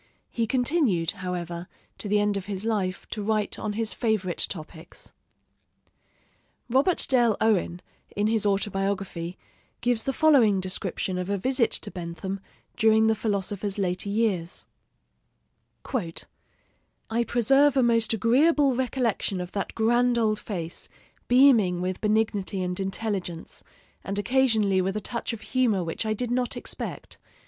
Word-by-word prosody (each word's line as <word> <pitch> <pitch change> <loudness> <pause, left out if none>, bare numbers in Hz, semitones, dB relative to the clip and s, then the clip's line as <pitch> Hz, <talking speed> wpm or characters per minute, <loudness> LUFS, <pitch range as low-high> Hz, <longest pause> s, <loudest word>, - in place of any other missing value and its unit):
He 230 -1 -1
continued, 245 - +1
however, 175 -3 -5 0.3
to - - -5
the 210 +1 +3
end 205 0 +1
of 195 -1 -4
his 200 0 -4
life 195 -5 -1
to 215 - -3
write 210 0 -1
on 215 -1 -3
his 225 +1 -2
favorite 210 -6 -1
topics. 160 -1 -8 1.6
Robert 270 +9 +3
Dale 240 -5 +3
Owen, 190 -5 +1 0.3
in 205 - +1
his 220 -1 +2
autobiography, 195 -3 -1 0.4
gives 240 -2 +1
the 270 - +1
following 260 -9 +4
description 185 0 -2
of 180 +1 -4
a 200 - 0
visit 255 +3 +2
to - - -2
Bentham 180 +2 -5 0.4
during 220 -1 +4
the 220 - +4
philosopher's 205 -2 -2
later 185 0 -1
years: 200 -5 -1 1.3
"I 225 +3 -6
preserve 270 +5 +3
a 260 - +5
most 230 -2 +3
agreeable 270 - +3
recollection 240 -6 -1
of 180 0 -5
that 200 - -4
grand 240 +2 +3
old 215 -2 +1
face, 170 -6 -5 0.4
beaming 240 -9 +5
with 185 +1 -3
benignity 210 -3 0
and 180 +1 -3
intelligence, 195 -3 -3 0.4
and 195 +1 -4
occasionally 215 -4 +2
with 190 +2 -1
a - - 0
touch 235 +4 -3
of 230 -2 -7
humor 225 -4 +1
which 165 +6 -3
I 215 - +1
did 245 +2 -3
not 245 0 0
expect.... - - -6
210 Hz, 140 wpm, -26 LUFS, 190-235 Hz, 1.6 s, a